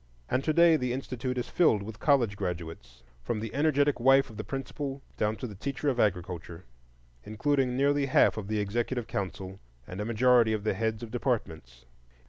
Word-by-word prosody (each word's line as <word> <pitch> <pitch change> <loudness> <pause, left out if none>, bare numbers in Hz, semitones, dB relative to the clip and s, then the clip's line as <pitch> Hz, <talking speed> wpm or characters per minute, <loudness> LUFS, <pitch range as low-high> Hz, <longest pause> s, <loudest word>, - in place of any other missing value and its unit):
And 130 - 0
to 155 - +2
day 170 0 +5
the 125 -3 -2
institute 130 -1 -4
is 125 - -2
filled 115 - +2
with 105 0 -9
college 125 -8 +2
graduates, 85 -10 -6 0.2
from 105 - -3
the 110 0 -6
energetic 145 -1 +2
wife 135 +1 +4
of 110 - -12
the 110 - -4
principal 135 +3 -5
down 105 +1 0
to 120 - -6
the 110 - -7
teacher 140 +8 -3
of 125 -3 -1
agriculture, 90 -4 -2 0.6
including 130 +3 0
nearly 140 0 +2
half - - +4
of 110 -3 -5
the 110 0 -1
executive 120 +4 -2
council 95 -1 -5 0.3
and 90 +8 -6
a - - -3
majority 115 0 +4
of 105 -2 -2
the 110 - +1
heads 110 +2 -2
of 115 - -8
departments. 80 - -3
115 Hz, 185 wpm, -28 LUFS, 100-135 Hz, 0.6 s, day